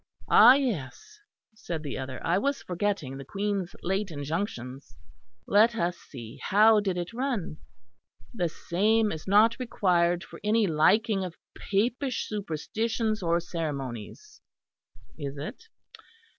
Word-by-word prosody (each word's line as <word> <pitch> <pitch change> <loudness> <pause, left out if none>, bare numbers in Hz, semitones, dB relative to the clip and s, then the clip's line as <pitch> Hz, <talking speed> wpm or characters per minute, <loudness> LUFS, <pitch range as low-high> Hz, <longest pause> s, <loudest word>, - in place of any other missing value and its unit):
"Ah 250 - +9
yes," 250 - -3 0.3
said 170 -7 -6
the 145 - -4
other, 130 -1 -5
"I 175 +3 +2
was 280 +4 -1
forgetting 180 -7 -2
the 135 - -7
Queen's 195 +3 -3
late 195 +2 -1
injunctions. 140 - -5 0.5
Let 220 +3 +4
us 175 -4 0
see; 120 -9 -11
how 215 +2 +5
did 195 -3 -1
it 175 +5 -4
run? 240 - -2 0.8
'The 180 -7 -1
same 210 +7 +1
is 160 +3 -7
not 215 +5 +4
required 175 -7 +1
for - - -12
any 215 +1 +3
liking 195 +5 +3
of 180 -2 -6 0.2
Papish 240 +6 -1
Superstitions 215 +4 -2
or 170 -1 +2
Ceremonies 150 - -6 0.8
(is 140 -1 -5
it?) 215 - -7
190 Hz, 125 wpm, -27 LUFS, 155-220 Hz, 0.8 s, Ah